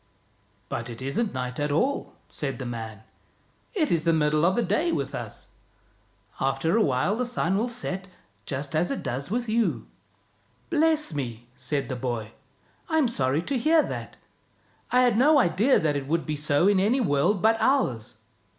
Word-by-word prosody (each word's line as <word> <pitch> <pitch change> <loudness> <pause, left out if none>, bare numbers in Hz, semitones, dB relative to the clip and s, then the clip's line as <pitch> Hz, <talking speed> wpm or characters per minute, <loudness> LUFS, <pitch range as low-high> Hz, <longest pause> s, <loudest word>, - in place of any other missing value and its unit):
" 100 0 -38
But 120 +1 -4
it 115 -1 -8
isn't 140 - -1
night 125 0 -4
at 145 0 0
all," 255 - 0
said 140 -4 -4
the 130 - -6
man. 110 -3 -6 0.4
" - - -37 0.3
It 315 -7 +1
is 165 -2 +2
the 170 - +3
middle 155 0 +2
of 185 +2 +3
the 240 - +2
day 340 +2 +1
with - - -2
us. - - -7 0.9
After 165 +3 +1
a 225 - +4
while 135 +9 +1
the 250 - -1
sun 240 -7 0
will 225 +5 0
set, 195 -6 -4 0.4
just 140 +2 -4
as 165 +3 +1
it 275 - -3
does 130 +4 -3
with 240 +3 -1
you." 225 +1 0 0.4
" - - -38
Bless 315 - +2
me! 120 -4 -5
" - - -34
said 140 -4 0
the 130 - -3
boy. 120 -3 -3 0.6
"I'm 315 -4 +3
sorry 145 - 0
to 270 +2 -1
hear 315 +4 +4
that. - - -6 0.7
I 250 - +4
had 240 -3 +3
no 295 +4 +6
idea 235 +3 +4
that 155 -2 0
it 140 -1 -3
would 165 +2 0
be 155 - -2
so 145 +4 +2
in 200 -2 +4
any 220 +8 +2
world 180 - +2
but 225 +1 +4
ours. 220 - +1
165 Hz, 190 wpm, -26 LUFS, -, 0.9 s, no